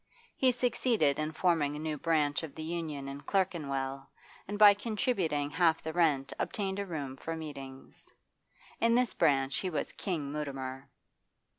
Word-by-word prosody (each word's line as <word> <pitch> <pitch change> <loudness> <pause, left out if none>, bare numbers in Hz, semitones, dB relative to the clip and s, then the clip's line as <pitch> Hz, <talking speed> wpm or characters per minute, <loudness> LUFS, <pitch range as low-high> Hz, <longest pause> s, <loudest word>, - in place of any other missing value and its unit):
He 260 -1 +4
succeeded 235 - +1
in 155 0 -1
forming 160 -4 +1
a - - -5
new 155 0 -2
branch 150 -1 +1
of 160 -4 -8
the 160 - -5
Union 155 -4 -4
in 140 +1 -6
Clerkenwell, 140 -9 -1 0.4
and 205 +1 -3
by 205 -1 +9
contributing 200 - -1
half 165 0 +2
the 160 - -4
rent 150 -6 +2
obtained 195 -1 -2
a 200 - -3
room 145 -6 -4
for 165 +4 -5
meetings. 135 -4 -9 0.7
In 230 0 +4
this 250 -4 +2
branch 135 -1 +2
he 185 - -1
was 155 -5 -2
King 160 -8 -3
Mutimer. 135 -2 -5
155 Hz, 155 wpm, -31 LUFS, 140-190 Hz, 0.7 s, by